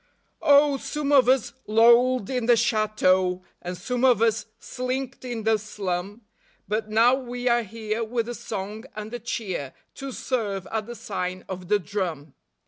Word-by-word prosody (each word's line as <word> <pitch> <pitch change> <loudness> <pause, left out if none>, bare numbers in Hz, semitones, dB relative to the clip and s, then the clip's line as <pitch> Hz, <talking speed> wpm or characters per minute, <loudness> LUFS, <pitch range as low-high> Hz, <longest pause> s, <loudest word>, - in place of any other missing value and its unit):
Oh, 285 -2 +5
some 295 +1 -3
of 265 -3 +6
us 250 -2 +2
lolled 235 +1 +5
in 250 -3 -1
the 240 -1 +6
chateau, 210 -5 +2 0.2
And 180 0 -5
some 250 +5 -3
of 250 -4 +5
us 225 -1 +1
slinked 255 +2 -4
in 240 -3 -4
the 220 0 +3
slum; 200 0 -4 0.5
But 215 +2 -2
now 230 +3 +5
we 245 -1 -3
are 240 0 +4
here 220 +1 -4
with 230 0 -2
a 240 - -4
song 210 +1 -6
and 215 +2 -7
a 240 - -3
cheer 195 - -4 0.2
To 275 0 -7
serve 210 -8 -2
at 220 -1 -2
the 240 - -7
sign 185 -4 -4
of 185 -1 -6
the 210 - +4
drum. 175 -7 -4
225 Hz, 165 wpm, -25 LUFS, 200-245 Hz, 0.5 s, of